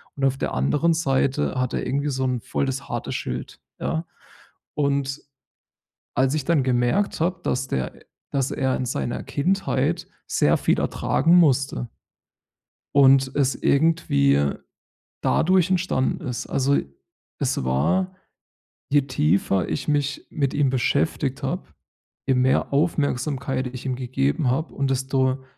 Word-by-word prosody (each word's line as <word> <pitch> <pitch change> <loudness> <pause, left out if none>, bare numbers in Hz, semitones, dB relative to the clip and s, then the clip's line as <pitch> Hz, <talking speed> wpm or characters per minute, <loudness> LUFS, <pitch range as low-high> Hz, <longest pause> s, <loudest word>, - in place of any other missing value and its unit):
und 140 - -5
auf 135 0 +1
der - - -2
anderen 145 - +2
Seite 135 - 0
hat 125 -1 -1
er - - -2
irgendwie 140 +2 -1
so 130 -1 -2
'n 125 -1 0
voll 140 - -2
das 135 +1 -4
harte - - -3
Schild, 65 +1 -5 0.2
ja. 160 +1 -2 0.7
Und 140 -1 0 0.9
als 130 +3 +2
ich 150 - -1
dann 165 -4 +2
gemerkt 130 +12 +1
habe, 175 +2 0
dass 130 +1 -1
der 65 -1 -3 0.3
dass 135 -2 0
er 130 -1 0
in 130 - -2
seiner 120 0 -2
Kindheit 190 +7 0 0.2
sehr - - +3
viel - - +1
ertragen 165 +6 +2
musste 140 -6 +2 1.1
und 135 -1 +5
es 135 -2 +2
irgendwie 70 - +2 0.7
dadurch 185 +1 +3
entstanden 175 -8 0
ist 125 -1 -4
also 140 +1 +2 0.6
es - - 0
war 185 - +1 0.8
je 145 0 +4
tiefer 95 - +1
ich 140 - -3
mich 145 -2 0
mit 140 -3 -1
ihm 145 -2 +2
beschäftigt 135 +1 0
habe, - - -2 0.6
je 135 - +3
mehr 130 +2 +2
Aufmerksamkeit 140 -3 0
ich 130 +1 -7
ihm 130 - 0
gegeben 125 - 0
habe 155 +6 -2
und 140 -1 -1
desto 130 0 0
135 Hz, 135 wpm, -23 LUFS, 130-150 Hz, 1.1 s, und